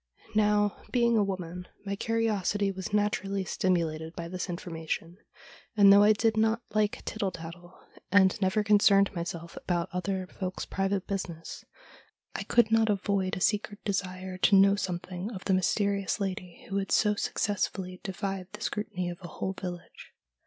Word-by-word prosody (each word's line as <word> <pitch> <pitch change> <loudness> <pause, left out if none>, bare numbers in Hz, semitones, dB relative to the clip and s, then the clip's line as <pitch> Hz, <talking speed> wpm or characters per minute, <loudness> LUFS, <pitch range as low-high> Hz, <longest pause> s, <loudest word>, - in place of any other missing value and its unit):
Now, 210 -1 +3
being 235 -2 +3
a 215 - +4
woman, 180 -2 -4 0.2
my 200 0 -2
curiosity 205 -2 0
was 190 0 -6
naturally 200 -2 0
stimulated 165 -3 -1
by 170 -1 -5
this 185 +1 -4
information, 170 0 -4 0.6
and 200 -1 +8
though 200 - +8
I 210 +1 +7
did 220 +1 +1
not 225 +2 +2
like 215 -1 0
tittle 205 -3 -1
tattle, 175 +1 -10 0.3
and 190 -1 +5
never 190 +3 +2
concerned 200 -1 +5
myself 170 -1 -5
about 175 -2 -1
other 185 +1 -2
folks' 185 0 -5
private 195 0 -1
business, 175 -4 -5 0.7
I - - -3
could 235 -2 +3
not 225 -1 +4
avoid 200 -1 0
a - - -6
secret 205 +1 0
desire 185 -2 -3
to 200 - +5
know 195 +1 +6
something 180 0 -4
of 190 - -8
this 195 - +2
mysterious 200 +1 +1
lady, 185 -3 -5
who 195 - -2
had 195 -1 -2
so 210 -1 +4
successfully 190 -3 -2
defied 195 -1 -4
the 210 - -9
scrutiny 185 -5 -3
of 175 0 -5
a 175 - -7
whole 190 +4 -4
village. 180 -2 -8
195 Hz, 160 wpm, -29 LUFS, 180-205 Hz, 0.7 s, and